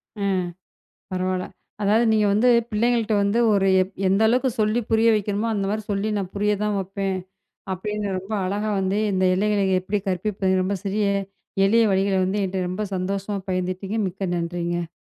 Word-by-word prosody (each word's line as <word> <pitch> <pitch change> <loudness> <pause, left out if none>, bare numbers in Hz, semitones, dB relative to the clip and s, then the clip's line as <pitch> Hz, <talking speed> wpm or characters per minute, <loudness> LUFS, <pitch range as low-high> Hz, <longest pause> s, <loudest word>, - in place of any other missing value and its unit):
ம். 200 -2 0 0.7
அ - - -1
பரவாயில்ல. 185 0 -1 0.4
அதாவது 215 +4 +3
நீங்க 215 -1 +3
வந்து 215 +5 +3 0.2
பிள்ளைங்கள்ட 230 0 +1
வந்து 200 +3 +1
ஒரு 195 -1 +3
எப் 185 - -7
எந்த 195 +2 +2
அளவுக்கு 255 +3 +2
சொல்லி 215 +2 +2
புரிய 225 +1 +4
வைக்கணுமோ! 210 +1 -1
அந்தமாரி 205 +1 -1
சொல்லி 200 +2 -1
நான் 190 -2 -3
புரிய 210 +1 +1
தான் 210 -1 0
வப்பேன், 195 0 -3 0.6
அப்பிடின்னு 205 +1 -3
ரொம்ப 195 +4 -5
அழகா 205 +3 -1
வந்து 190 +2 0
இந்த 190 0 +1
எல்லைகள 205 +1 +1 0.2
எப்பிடி 200 +3 -2
கற்பிப்பேன், 190 0 0
ரொம்ப 195 +2 -1
சிறிய 205 +1 0 0.6
எளிய 230 +3 +4
வழிகள 195 0 +2
வந்து 200 +2 -1
என்ட்ட 190 0 -2
ரொம்ப 185 +4 -3
சந்தோஷமா 195 +2 -2
பகிர்ந்துட்டீங்க. 185 +3 -2
மிக்க 190 +2 -5
நன்றிங்க. 170 0 -2
200 Hz, 160 wpm, -23 LUFS, 185-210 Hz, 0.7 s, புரிய